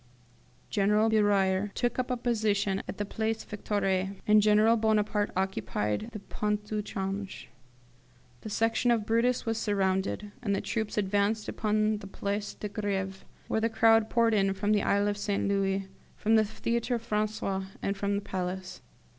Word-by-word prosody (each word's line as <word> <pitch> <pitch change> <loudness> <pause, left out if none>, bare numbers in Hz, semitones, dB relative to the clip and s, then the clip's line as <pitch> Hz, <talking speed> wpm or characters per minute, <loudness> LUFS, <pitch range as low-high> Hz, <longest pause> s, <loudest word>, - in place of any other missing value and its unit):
General 210 +2 +3
Beruyer 200 -2 +2
took 245 0 0
up 255 - -1
a 250 - 0
position 210 -5 0
at - - -6
the 205 - -2
Place 220 +2 -2
Victoire, 195 -2 -1
and 210 0 +6
General 215 +2 +5
Bonaparte 215 -2 +1
occupied 190 - -1
the 215 - -6
Pont 210 +1 -3
au 210 - 0
Change. 195 -1 -5 0.9
"The - - -7
Section 225 +3 +1
of 230 -3 +2
Brutus 235 +3 +1
was 225 -1 -1
surrounded, 195 0 0
and 200 -4 0
the - - 0
troops 220 -2 -3
advanced 205 +2 +1
upon 215 0 0
the 195 - -9
Place 200 +1 -3
de 210 - -5
Greve, 195 -2 -3 0.2
where 220 - 0
the 230 - +2
crowd 225 0 +4
poured 230 -1 +3
in 195 -2 +2
from 205 +2 0
the 210 -1 +3
Isle 205 +1 +2
St. 205 -1 -1
Louis, 195 -1 0 0.3
from 220 - +1
the 220 -1 +5
Theatre 235 +3 -1
Francais, 215 -3 -1 0.2
and 200 - 0
from 200 +1 -1
the 200 - -1
Palace. 185 0 -4
210 Hz, 160 wpm, -29 LUFS, 195-220 Hz, 0.9 s, and